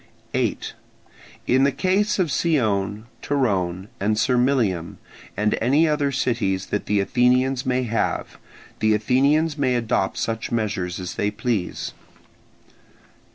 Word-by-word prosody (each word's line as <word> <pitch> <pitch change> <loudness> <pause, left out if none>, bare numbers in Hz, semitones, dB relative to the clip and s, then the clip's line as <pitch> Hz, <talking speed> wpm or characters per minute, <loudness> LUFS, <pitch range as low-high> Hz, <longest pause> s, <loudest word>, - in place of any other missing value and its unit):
8. - - -1 0.7
In 130 +2 +3
the 140 - +4
case 190 - +1
of 180 -5 +1
Scione, 110 - 0 0.2
Torone, 95 -9 0
and 105 +2 +1
Sermylium, 120 -8 +1 0.4
and 105 0 +2
any 140 +8 +3
other 145 -2 +1
cities 115 -8 0
that 105 - -2
the 105 -1 +2
Athenians 125 +5 +2
may 130 0 +1
have, 115 -2 -2 0.4
the 110 0 +3
Athenians 145 +8 +2
may 130 -3 +2
adopt 115 -5 0
such 115 -1 -3
measures 100 -6 -2
as 90 -1 -5
they 105 - +1
please. 105 -4 -3
120 Hz, 120 wpm, -23 LUFS, 105-135 Hz, 0.7 s, the